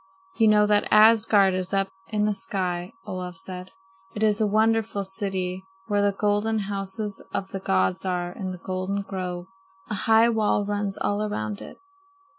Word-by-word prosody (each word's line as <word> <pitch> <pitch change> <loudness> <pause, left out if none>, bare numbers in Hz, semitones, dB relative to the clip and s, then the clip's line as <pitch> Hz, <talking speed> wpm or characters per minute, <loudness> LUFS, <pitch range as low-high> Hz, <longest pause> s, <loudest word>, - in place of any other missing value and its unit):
"You 225 -1 +5
know 210 0 +5
that 210 0 +2
Asgard 215 -3 +6
is 185 +1 -2
up 195 0 +2 0.2
in 210 -1 0
the 210 - +1
sky," 185 -2 -3
Olaf 180 0 -5
said. 185 -1 -6 0.5
"It 215 - -2
is 215 0 +2
a 215 - +3
wonderful 220 -1 +1
city 190 -1 -2 0.2
where 205 0 +1
the 205 0 +3
golden 205 +2 0
houses 200 0 -3
of 195 -1 -3
the 195 - -5
gods 95 - +1
are 180 -1 -2
in 185 +1 -5
the 185 - -5
golden 190 +2 -2
grove. 180 -2 -5 0.5
A 210 +1 -3
high 225 +1 +6
wall 215 -2 +1
runs 205 -1 -2
all 205 0 -1
around 110 - -3
it. - - -10
200 Hz, 170 wpm, -25 LUFS, 185-210 Hz, 0.5 s, Asgard